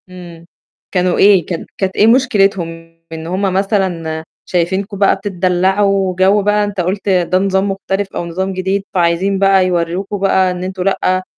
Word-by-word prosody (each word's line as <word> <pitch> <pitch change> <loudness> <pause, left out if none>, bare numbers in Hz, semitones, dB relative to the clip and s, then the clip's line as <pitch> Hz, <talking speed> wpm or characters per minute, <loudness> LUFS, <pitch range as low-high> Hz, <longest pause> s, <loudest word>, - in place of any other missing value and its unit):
إمم. 175 -2 -12 0.5
كانوا 180 -1 +1
إيه؟ 195 -4 +5
كان 170 -3 -5
كانت 190 -1 -2
إيه 215 - +4
مشكلتهم؟ 195 -9 +1 0.2
إن 160 0 -7
هم 185 +3 -2
مثلًا 185 -5 -1 0.2
شايفينكم 190 +3 -2
بقى 195 0 +3
بتتدلَّعوا 190 0 0
جَو 190 +3 +3
بقى 210 +1 +2
أنت 205 -2 -2
قُلت 195 +3 -2
ده 185 -1 +2
نظام 195 +1 0
مختلف 195 0 -3
أو - - -3
نظام 190 +3 -3
جديد، 190 +1 -2
فعايزين 185 +2 +1
بقى 195 -1 +4
يورِّوكم 180 +3 -2
بقى 190 -1 +2
إن 180 0 -5
أنتم 185 0 -4
لأ، 185 -1 0
190 Hz, 160 wpm, -15 LUFS, 180-195 Hz, 0.5 s, إيه